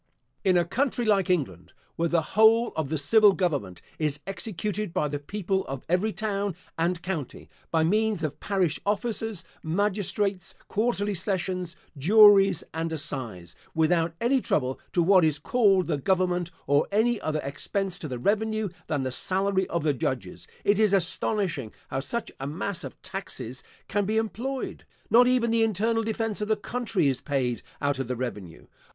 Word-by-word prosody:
In 185 Hz, -2 st, +4 dB
a 175 Hz, -, +3 dB
country 245 Hz, -, 0 dB
like 200 Hz, -3 st, +2 dB
England, 105 Hz, -, -1 dB, 0.2 s
where 170 Hz, 0 st, 0 dB
the 170 Hz, -1 st, +2 dB
whole 225 Hz, +2 st, +5 dB
of 155 Hz, -4 st, -2 dB
the 160 Hz, -, -1 dB
civil 205 Hz, +8 st, +5 dB
Government 145 Hz, -, -2 dB, 0.2 s
is 150 Hz, -2 st, 0 dB
executed 210 Hz, -1 st, -4 dB
by 150 Hz, -, +1 dB
the 145 Hz, 0 st, -3 dB
people 190 Hz, +4 st, -2 dB
of 135 Hz, -1 st, -6 dB
every 185 Hz, +6 st, +1 dB
town 205 Hz, -3 st, -2 dB, 0.2 s
and 170 Hz, +1 st, -1 dB
county, 165 Hz, -9 st, -5 dB, 0.2 s
by 160 Hz, -1 st, +2 dB
means 210 Hz, +1 st, +1 dB
of 150 Hz, -2 st, -3 dB
parish 190 Hz, -6 st, 0 dB
officers, 215 Hz, -1 st, -1 dB, 0.2 s
magistrates, 200 Hz, +2 st, -1 dB
quarterly 210 Hz, -2 st, 0 dB
sessions, 185 Hz, -2 st, -2 dB, 0.2 s
juries, 195 Hz, +3 st, +6 dB
and 165 Hz, +1 st, -2 dB
assize; 120 Hz, -, -3 dB, 0.2 s
without 165 Hz, +1 st, +2 dB
any 255 Hz, +3 st, +2 dB
trouble 130 Hz, -, 0 dB
to 175 Hz, -, +2 dB
what 185 Hz, 0 st, +5 dB
is 155 Hz, -2 st, +2 dB
called 195 Hz, +2 st, +3 dB
the 155 Hz, -4 st, -1 dB
government 180 Hz, +1 st, +1 dB, 0.2 s
or 145 Hz, +1 st, +3 dB
any 225 Hz, +2 st, +2 dB
other 155 Hz, -1 st, -1 dB
expense 185 Hz, +7 st, -2 dB
to 155 Hz, -, -5 dB
the 130 Hz, -3 st, -4 dB
revenue 215 Hz, -, 0 dB, 0.2 s
than 145 Hz, -4 st, -1 dB
the 130 Hz, -, -2 dB
salary 190 Hz, +6 st, 0 dB
of 170 Hz, -2 st, -2 dB
the 150 Hz, -2 st, +2 dB
judges, 130 Hz, 0 st, -4 dB, 0.2 s
it 205 Hz, 0 st, +3 dB
is 215 Hz, -2 st, +4 dB
astonishing 180 Hz, -, 0 dB, 0.2 s
how 135 Hz, -, -2 dB
such 235 Hz, -, -3 dB
a 135 Hz, -, -4 dB
mass 170 Hz, +5 st, -3 dB
of -, -, -8 dB
taxes 160 Hz, -, -6 dB, 0.3 s
can 205 Hz, 0 st, 0 dB
be 215 Hz, +2 st, 0 dB
employed. 245 Hz, +4 st, -3 dB, 0.3 s
Not 245 Hz, +2 st, +7 dB
even 250 Hz, -2 st, +2 dB
the 230 Hz, 0 st, +2 dB
internal 225 Hz, +2 st, +1 dB
defence 225 Hz, -1 st, -2 dB
of 210 Hz, -, -1 dB
the 220 Hz, -, +3 dB
country 210 Hz, -6 st, -1 dB
is 135 Hz, -2 st, 0 dB
paid 130 Hz, -5 st, -1 dB, 0.2 s
out 145 Hz, -2 st, 0 dB
of 135 Hz, -, -2 dB
the 125 Hz, -, -2 dB
revenue. 105 Hz, -9 st, -6 dB
185 Hz, 170 wpm, -26 LUFS, 150-210 Hz, 0.3 s, Not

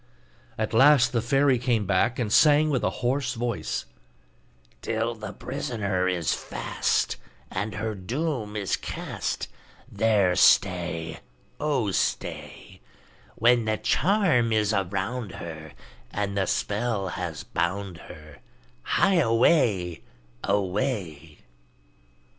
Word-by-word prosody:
At 110 Hz, 0 st, -2 dB
last 135 Hz, +2 st, +6 dB
the 115 Hz, -, 0 dB
fairy 135 Hz, +2 st, +3 dB
came 115 Hz, -4 st, 0 dB
back 100 Hz, +6 st, +1 dB
and 110 Hz, -4 st, -1 dB
sang 150 Hz, 0 st, +5 dB
with 130 Hz, -, 0 dB
a -, -, +2 dB, 0.2 s
hoarse 130 Hz, 0 st, 0 dB
voice: 120 Hz, -1 st, -3 dB, 1.0 s
'Till 115 Hz, +1 st, -1 dB
the 110 Hz, -3 st, -7 dB
prisoner 105 Hz, -8 st, -2 dB
is 90 Hz, -3 st, 0 dB
fast, -, -, -1 dB, 0.3 s
And 100 Hz, +3 st, -3 dB
her 110 Hz, +1 st, -2 dB
doom 115 Hz, -, -3 dB
is 100 Hz, -3 st, 0 dB
cast, -, -, -4 dB, 0.4 s
There 100 Hz, -4 st, +2 dB
stay! 85 Hz, -5 st, +2 dB, 0.4 s
Oh, 140 Hz, -9 st, 0 dB
stay! -, -, -3 dB, 0.5 s
When 120 Hz, 0 st, +3 dB
the 110 Hz, 0 st, 0 dB
charm 170 Hz, -, +2 dB
is 110 Hz, -1 st, +2 dB
around 100 Hz, +3 st, -2 dB
her, 80 Hz, -2 st, -8 dB, 0.4 s
And 100 Hz, -1 st, -3 dB
the 95 Hz, -2 st, 0 dB
spell 105 Hz, -1 st, -1 dB
has 85 Hz, -3 st, -5 dB
bound 95 Hz, +1 st, -2 dB
her, 75 Hz, -2 st, -13 dB, 0.4 s
Hie 190 Hz, -, +2 dB
away! 115 Hz, -, +2 dB, 0.4 s
away! 95 Hz, -, -2 dB
110 Hz, 110 wpm, -26 LUFS, 95-125 Hz, 1.0 s, last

